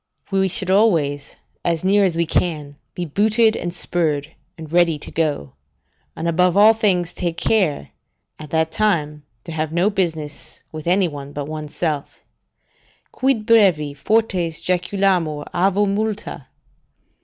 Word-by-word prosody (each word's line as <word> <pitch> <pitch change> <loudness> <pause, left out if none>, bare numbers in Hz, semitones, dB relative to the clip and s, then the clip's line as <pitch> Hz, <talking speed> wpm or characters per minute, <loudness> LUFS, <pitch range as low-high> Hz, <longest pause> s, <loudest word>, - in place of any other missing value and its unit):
We 190 0 +2
should 190 0 0
always, 160 -9 +1 0.3
as 170 -1 -1
near 200 +2 +4
as 185 -4 +1
we 170 0 +1
can, 155 -3 -1 0.2
be 175 - -3
booted 220 +7 +2
and 175 - -3
spurred, 160 -3 -2 0.2
and 160 -1 -10
ready 170 -3 +3
to - - -11
go, 150 - -2 0.6
and, 165 - -3
above 180 +2 +2
all 215 +2 +7
things, 185 -6 0
take 170 -2 -3
care, 180 - 0 0.5
at 155 -1 -9
that 160 +1 0
time, 155 -9 0 0.2
to - - -8
have 155 -1 -2
no 175 +5 +2
business 160 -6 -4
with 155 0 -8
any 185 +1 +3
one 145 -2 -8
but 145 -1 -4
one's 155 -1 -7
self: 150 -5 -3 0.9
"Quid 260 -5 0
brevi 190 - +4
fortes 180 -1 0
jaculamur 180 -4 0
avo 195 +3 +2
Multa?" 210 +1 -3
175 Hz, 145 wpm, -20 LUFS, 155-195 Hz, 0.9 s, all